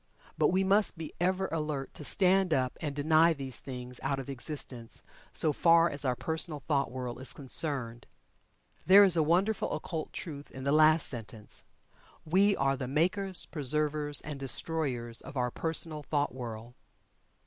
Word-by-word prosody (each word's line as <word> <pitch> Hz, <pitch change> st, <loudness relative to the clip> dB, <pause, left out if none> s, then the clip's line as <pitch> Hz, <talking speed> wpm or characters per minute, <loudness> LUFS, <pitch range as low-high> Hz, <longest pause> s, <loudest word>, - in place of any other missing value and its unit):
But -, -, +3 dB
we 190 Hz, +2 st, +2 dB
must 200 Hz, 0 st, +3 dB
be 160 Hz, -2 st, -7 dB
ever 185 Hz, +2 st, 0 dB
alert, 150 Hz, -4 st, -3 dB
to -, -, -8 dB
stand 185 Hz, +1 st, +3 dB
up 130 Hz, -1 st, -1 dB
and 145 Hz, -3 st, -3 dB
deny 160 Hz, +3 st, +4 dB
these 135 Hz, -5 st, -5 dB
things 125 Hz, -1 st, -8 dB
out 135 Hz, 0 st, -1 dB
of 135 Hz, 0 st, -7 dB
existence 130 Hz, -3 st, -6 dB, 0.3 s
so 155 Hz, -2 st, +1 dB
far 170 Hz, +1 st, +4 dB
as 140 Hz, 0 st, 0 dB
our 125 Hz, -1 st, +1 dB
personal 160 Hz, +1 st, -2 dB
thought 140 Hz, -4 st, +1 dB
world 125 Hz, 0 st, -6 dB
is 130 Hz, -, -2 dB
concerned. 130 Hz, -4 st, -1 dB, 0.8 s
There 195 Hz, +4 st, +8 dB
is 190 Hz, -4 st, +4 dB
a 165 Hz, -, +3 dB
wonderful 185 Hz, +7 st, +1 dB
occult 160 Hz, -3 st, -5 dB
truth 145 Hz, -5 st, -7 dB
in 130 Hz, -, -9 dB
the 140 Hz, -, 0 dB
last 155 Hz, +1 st, +5 dB
sentence. 110 Hz, -3 st, -5 dB, 0.6 s
We 195 Hz, +5 st, +3 dB
are 135 Hz, 0 st, +1 dB
the 130 Hz, -1 st, -5 dB
makers, 185 Hz, +7 st, 0 dB
preservers, 150 Hz, 0 st, 0 dB
and 145 Hz, -2 st, -7 dB
destroyers 135 Hz, -4 st, 0 dB
of 140 Hz, -, -9 dB
our 125 Hz, -1 st, 0 dB
personal 160 Hz, 0 st, -3 dB
thought 145 Hz, -3 st, -1 dB
world. 120 Hz, -2 st, -7 dB
150 Hz, 160 wpm, -30 LUFS, 130-165 Hz, 0.8 s, There